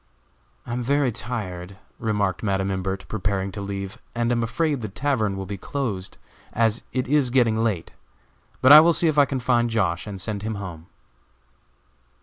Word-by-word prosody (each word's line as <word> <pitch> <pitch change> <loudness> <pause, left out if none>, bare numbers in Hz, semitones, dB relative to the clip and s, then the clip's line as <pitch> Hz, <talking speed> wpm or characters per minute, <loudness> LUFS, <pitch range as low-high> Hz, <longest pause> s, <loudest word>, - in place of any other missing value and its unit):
"I 120 - -5
am 125 - -2
very 140 +1 +2
tired," 100 -6 -5 0.2
remarked 105 -4 0
Madam 95 -2 0
Imbert, 95 0 -3
preparing 100 -2 -2
to 100 - -6
leave, 100 0 -5 0.2
"and 120 0 0
am 120 -1 +1
afraid 145 +4 0
the 110 - -4
tavern 110 -4 -1
will 95 - -4
be 100 0 -6
closed, 105 -8 -4 0.4
as 115 0 +1
it 130 -1 -1
is 140 -2 +3
getting 115 -3 +2
late; 100 -8 -1 0.7
but 130 - +7
I 150 - +13
will 170 +2 +5
see 170 - +3
if 150 -1 +2
I 145 - +7
can 135 -1 -3
find 120 -1 +2
Josh., 95 -5 0
and 100 -2 -6
send 100 +2 -3
him 110 +1 -3
home." 90 -5 -8
110 Hz, 175 wpm, -24 LUFS, 95-125 Hz, 0.7 s, I